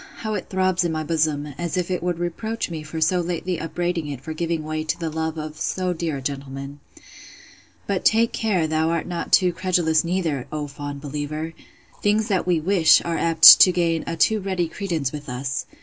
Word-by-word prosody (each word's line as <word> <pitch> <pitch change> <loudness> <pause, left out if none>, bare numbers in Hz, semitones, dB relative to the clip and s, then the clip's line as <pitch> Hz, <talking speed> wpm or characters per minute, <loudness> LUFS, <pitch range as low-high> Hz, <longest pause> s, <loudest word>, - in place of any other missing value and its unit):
how 220 -1 -4
it - - -5
throbs 185 -1 +1
in 170 - -1
my 155 -1 -2
bosom, 150 -2 -1
as 175 0 -3
if 180 0 -2
it 180 - -1
would 175 -1 -2
reproach 180 +5 -3
me 160 -2 -5
for 155 +1 -6
so 175 +3 +2
lately 175 0 -3
upbraiding 175 -1 -3
it 140 -3 -5
for 155 +4 -7
giving 165 0 -2
way 155 0 -3
to 155 - -3
the 165 -2 -3
love 160 0 -3
of 155 0 -6
so 185 -1 -1
dear 160 -3 -3
a - - -7
gentleman!—But 140 +7 -8
take 230 +1 +3
care 200 -7 0
thou 160 +1 0
art 165 -1 -1
not 175 -1 -5
too 180 -2 +4
credulous 170 -3 +1
neither, 165 -7 -2
O 150 -1 -3
fond 145 0 -7
believer! 150 +2 -5 0.5
Things 210 +2 +1
that 190 -3 0
we 175 -3 +2
wish, 170 0 +5
are 170 -1 -1
apt 165 -1 +9
to 185 - +8
gain 170 -2 0
a 165 - -3
too 220 +4 +3
ready 190 -3 -2
credence 165 -7 -3
with 150 -2 -8
us. 130 +2 -3
165 Hz, 200 wpm, -22 LUFS, 155-180 Hz, 0.5 s, apt